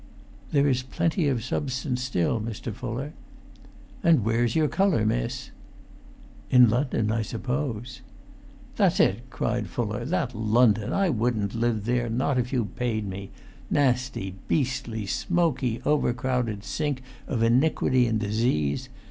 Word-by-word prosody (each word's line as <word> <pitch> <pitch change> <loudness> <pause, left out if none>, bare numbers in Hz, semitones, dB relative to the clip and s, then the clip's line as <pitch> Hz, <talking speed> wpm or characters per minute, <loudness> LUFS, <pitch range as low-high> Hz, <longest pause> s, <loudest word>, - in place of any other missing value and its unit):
"There 140 -1 +3
is 130 -2 +2
plenty 165 +5 0
of 125 -5 0
substance 130 0 -2
still, 115 -4 0
Mr. 115 +1 -5
Fuller." 125 +6 -5 0.9
"And 160 -11 +4
where's 115 +1 +1
your 155 -1 +3
colour, 185 - +2
miss?" - - -2 1.0
"In 125 -3 +7
London, 120 -3 0
I 115 0 0
suppose." 125 +1 -3 0.8
"That's - - +3
it," 120 +7 +2
cried 115 -4 -2
Fuller; 105 +3 -3
"that 155 -4 -1
London! 110 -1 +3
I 195 -2 +2
wouldn't 115 -6 0
live 115 -2 0
there, 120 0 0
not 130 +3 +1
if 125 0 -2
you 125 -5 +1
paid 110 -1 -2
me: 95 +1 -6 0.4
nasty, 125 -8 +1
beastly, 125 -6 -1
smoky, 145 - 0
overcrowded 125 -6 0
sink 145 -2 -2 0.2
of 115 -4 0
iniquity 125 0 +3
and 110 -1 0
disease! 105 - 0
120 Hz, 130 wpm, -26 LUFS, 110-130 Hz, 1.0 s, In